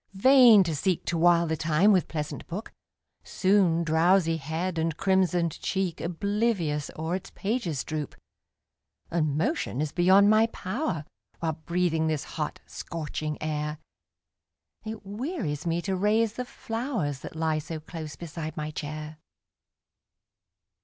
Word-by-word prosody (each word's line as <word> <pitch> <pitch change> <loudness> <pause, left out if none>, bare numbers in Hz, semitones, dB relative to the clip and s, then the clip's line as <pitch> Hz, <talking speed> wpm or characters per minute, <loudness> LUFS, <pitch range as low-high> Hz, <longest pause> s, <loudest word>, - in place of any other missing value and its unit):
vain 240 -1 +7
to 165 -3 -2
seek 180 +4 0
To 170 - -1
while 170 0 +4
the 160 -1 -1
time 165 +6 +3
with 185 -3 +3
pleasant 150 -2 -5
book, 195 +6 -6 0.5
Soon 185 -4 +2
drowsy 165 +1 +3
head 160 +4 -3
and 160 -1 -1
crimsoned 180 -4 +1
cheek 190 -4 -1
Oblivious 180 -4 -1
o'er 160 +2 -2
its 190 - -11
pages 195 - -2
droop 155 -3 -4 1.0
And 155 -4 0
motion 165 - -1
is 150 -1 -1
beyond 190 +3 +5
my 215 +2 +5
power, 200 - -3 0.3
While 160 -1 -1
breathing 170 -2 +1
this 155 -3 -1
hot, - - -5
scorching 155 -2 -5
air, 150 0 -2 1.1
It 220 -2 -7
wearies 205 - -3
me 170 +1 0
to 195 -2 -1
raise 210 +3 +2
the 250 +1 -4
flowers, 225 - -3
That - - -9
lie 160 -1 0
so 155 +1 -6
close 155 -1 -7
beside 165 -1 -6
my 155 0 -3
chair. 155 0 -6
170 Hz, 135 wpm, -27 LUFS, 155-200 Hz, 1.1 s, vain